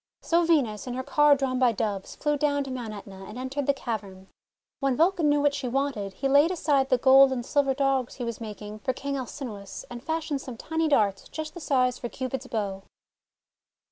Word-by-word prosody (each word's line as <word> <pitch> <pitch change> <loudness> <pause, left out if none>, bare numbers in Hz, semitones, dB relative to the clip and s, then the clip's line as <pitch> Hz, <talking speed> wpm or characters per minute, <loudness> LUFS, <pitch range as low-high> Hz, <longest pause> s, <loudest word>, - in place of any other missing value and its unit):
So 340 +1 +3
Venus, 265 -10 +1
in 245 - -3
her 260 - -3
car 295 +1 +5
drawn 265 -2 -1
by 250 -3 +4
Doves, 200 -3 -3
flew 295 -1 0
down 285 -1 +1
to 270 - -7
Mount 245 -4 -5
./Etna 195 -2 -10
and 215 - -8
entered 260 +2 -3
the - - +6
cavern. 195 -7 -6 0.5
When 275 -2 +1
Vulcan 335 -2 +3
knew 290 0 +3
what 290 0 +3
she 280 -2 -3
wanted, 245 -6 -1
he 275 - -2
laid 285 +4 +5
aside 285 -6 +1
the 255 - +4
gold 265 +2 +7
and 245 -2 -2
silver 275 -1 +1
Dogs 270 -2 0
he 250 - -5
was 235 -1 -4
making 210 -1 -7
for 260 +3 -1
King 280 +2 -4
Alcinous, 240 -6 -6
and 240 0 -7
fashioned 320 -3 -2
some 250 -4 -8
tiny 320 +4 -1
darts 205 -9 +1
just 310 -1 -6
the 345 - -8
size 255 -5 +1
for 240 - -4
Cupid's 260 +1 -4
bow. 200 -4 -3
260 Hz, 205 wpm, -27 LUFS, 230-285 Hz, 0.5 s, gold